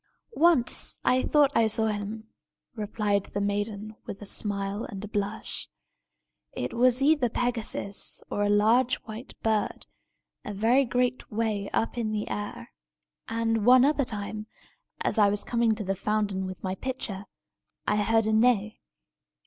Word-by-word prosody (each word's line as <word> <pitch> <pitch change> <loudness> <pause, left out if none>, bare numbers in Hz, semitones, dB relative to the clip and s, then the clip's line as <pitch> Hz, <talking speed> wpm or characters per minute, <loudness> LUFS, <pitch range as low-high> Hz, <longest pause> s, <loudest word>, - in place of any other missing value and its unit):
"Once 325 - +2
I 255 0 +4
thought 290 -1 +3
I 225 - +4
saw 220 +1 +2
him," 215 +1 -4 0.5
replied 205 -2 -1
the 200 - -4
maiden, 205 +1 -2
with 195 - -6
a 205 - -9
smile 200 0 +1
and 200 +1 -6
a - - -7
blush. 205 +1 -3 0.8
"It - - -4
was 250 +2 +3
either 290 -4 +3
Pegasus 230 -4 -2
or 205 - -1
a 205 - +2
large 225 +5 +4
white 220 +3 -9
bird, 220 -1 0 0.6
a 210 - -6
very 240 +7 +3
great 250 +1 -1
way 210 -2 -1
up 230 +2 -1
in 220 -2 -1
the 210 -1 -2
air. 205 0 -5 0.6
And 225 -1 0
one 250 +3 +7
other 290 0 +2
time, 215 -2 -5 0.5
as - - 0
I 205 -1 +6
was 205 0 0
coming 235 -2 +1
to 210 - -4
the 195 0 -1
fountain 200 -1 -1
with 185 -1 -8
my 185 -1 -1
pitcher, 205 -3 -5 0.6
I 210 - +1
heard 225 +2 +2
a 220 - +1
neigh. 220 -1 +2
215 Hz, 155 wpm, -27 LUFS, 205-235 Hz, 0.8 s, one